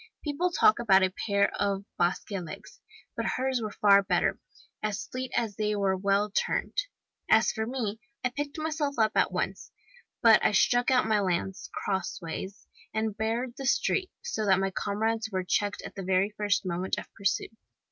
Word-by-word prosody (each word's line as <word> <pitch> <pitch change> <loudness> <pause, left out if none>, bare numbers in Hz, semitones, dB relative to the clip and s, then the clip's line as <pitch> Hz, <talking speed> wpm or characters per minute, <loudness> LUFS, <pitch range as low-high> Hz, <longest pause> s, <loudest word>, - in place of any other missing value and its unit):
People 300 +4 0
talk 430 +4 +4
about 195 -5 +5
a 185 -1 +1
pair 200 -1 +3
of 200 -1 0
Basque 175 +4 0
legs! 180 -5 -7 0.3
but - - -2
hers 260 -1 0
were 215 - -2
far 200 -1 +5
better 195 - +1 0.4
as 215 +5 -2
fleet 255 -1 -5
as 220 -4 -1
they 210 -1 0
were 195 -2 +1
well 200 +2 +1
turned. - - -1 0.6
As 220 +1 +5
for 220 -1 -3
me, 225 -4 -3 0.3
I - - +3
picked 285 +3 -4
myself 310 -2 -2
up 220 -1 +3
at - - +2
once, - - -3 0.5
but 225 -2 +7
I - - +3
stuck 245 +5 +3
out 255 -1 +4
my 215 -1 +2
lance* 190 0 -2
crossways 190 0 -4 0.3
and 220 -1 -1
barred 230 +3 -2
the 270 - -3
street, 370 +7 +1
so 220 - -2
that 190 -1 +5
my 195 0 0
comrades 220 +3 -1
were 185 -1 -1
checked 205 +2 0
at - - -8
the 195 - -6
very 190 +2 +1
first 205 -2 0
moment 180 +1 -2
of - - -5
pursuit. 200 +2 -1
210 Hz, 180 wpm, -28 LUFS, 195-245 Hz, 0.6 s, but